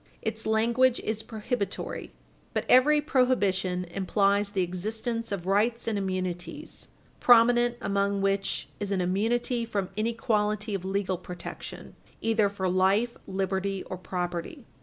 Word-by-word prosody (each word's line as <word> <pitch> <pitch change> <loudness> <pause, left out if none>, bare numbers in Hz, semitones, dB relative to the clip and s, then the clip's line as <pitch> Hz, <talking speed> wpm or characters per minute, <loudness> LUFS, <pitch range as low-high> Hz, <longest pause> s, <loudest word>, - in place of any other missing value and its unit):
Its 220 0 -3
language 235 +3 +3
is 220 0 -2
prohibitory, 220 -1 -4 0.4
but - - 0
every 295 +4 +6
prohibition 200 - +1
implies 200 +3 +1
the 195 -2 0
existence 220 +6 -3
of 190 -3 -3
rights 215 +5 +1
and 225 - 0
immunities, 185 - -4 0.3
prominent 240 0 +5
among 200 0 0
which 195 0 0
is 205 - -3
an 195 -2 0
immunity 230 +6 0
from 200 -5 -2
inequality 215 -1 0
of 195 -2 -2
legal 190 -1 -1
protection 180 -1 -8 0.2
either 220 -2 +2
for 195 -2 -2
life, 190 +6 +2
liberty, 190 0 -1
or 185 - -6
property. 175 -2 -4
205 Hz, 125 wpm, -28 LUFS, 190-230 Hz, 0.4 s, every